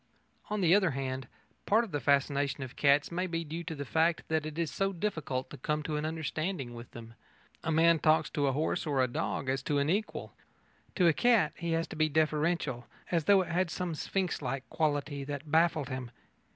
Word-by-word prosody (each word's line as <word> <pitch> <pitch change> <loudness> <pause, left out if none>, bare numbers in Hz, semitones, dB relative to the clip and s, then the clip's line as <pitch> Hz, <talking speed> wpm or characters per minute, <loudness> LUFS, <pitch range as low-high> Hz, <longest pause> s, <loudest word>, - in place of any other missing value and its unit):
On 210 -1 -1
the 175 -1 +5
other 195 -3 +4
hand, 130 -1 -3 0.4
part 220 +3 +4
of 225 - -7
the 145 - -1
fascination 140 0 +1
of 130 - -8
cats 140 +2 +3
may 180 +2 -1
be 165 -1 -2
due 165 +2 -5
to 165 - -4
the 140 -1 -5
fact 160 +4 +1
that 160 -1 0
it 155 0 -7
is 165 -3 -1
so 195 0 0
difficult 160 -9 -3
to - - -8
come 150 +3 -1
to 155 0 -3
an 150 +1 -1
understanding 155 -3 -3
with 120 0 -9
them. 115 -1 -11 0.5
A 165 - -1
man 165 +1 +5
talks 155 +1 +3
to 145 -1 +1
a - - +3
horse 155 +3 -1
or 135 -3 +2
a - - +2
dog 130 +2 -3
as 135 0 0
to 145 +1 0
an 140 +2 +2
equal. 210 +3 -2 0.6
To 180 - +3
a 165 - +5
cat 230 -6 +3
he 170 -1 -2
has 165 0 +1
to - - -7
be 155 0 +2
deferential 155 -4 0 0.2
as 165 -4 +1
though 200 +1 +6
it - - -9
had 180 +1 +1
some 175 +1 -3
Sphinx 185 +3 -2
like 135 0 -3
quality 145 -2 -1
that 145 +1 -6
baffled 160 -3 +3
him. 130 -2 -4
155 Hz, 215 wpm, -31 LUFS, 140-170 Hz, 0.6 s, though